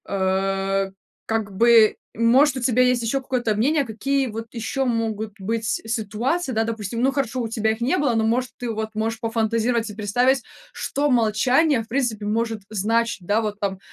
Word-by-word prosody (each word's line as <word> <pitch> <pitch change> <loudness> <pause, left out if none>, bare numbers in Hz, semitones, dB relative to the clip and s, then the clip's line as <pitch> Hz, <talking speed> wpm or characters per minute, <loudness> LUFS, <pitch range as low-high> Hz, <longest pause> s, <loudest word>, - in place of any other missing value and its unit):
Э, 195 0 0 0.3
как 220 -3 -2
бы, 230 0 +6 0.2
может, 260 +5 +4
у - - -2
тебя 250 0 +2
есть 250 -1 +2
еще 270 +4 0
какое-то 245 -4 -1
мнение, 280 +7 +2
какие 270 +4 -1
вот 225 0 -6
еще 240 +4 -2
могут 220 -3 -2
быть 225 +4 -2
ситуации, 225 - -2
да? 225 -2 +1
Допустим 225 0 -4
ну 265 +2 +3
хорошо 260 -3 -1
у 230 - -2
тебя 220 -1 0
их 220 - -4
не 260 +10 +1
было 280 -7 +1
но 220 -1 +2
может 250 +3 0
ты 245 - -4
вот 220 -1 -3
можешь 225 +1 -2
пофантазировать 230 0 0
и 210 - -9
представить. 245 +5 +1 0.3
Что 290 +1 -1
молчание, 250 +4 +3
в - - -18
принципе, 230 -5 -1
может 225 0 -1
значить? 220 -1 0
Да, 205 +4 +2
вот 210 -2 -4
там, 195 -2 -2
225 Hz, 180 wpm, -23 LUFS, 215-250 Hz, 0.3 s, бы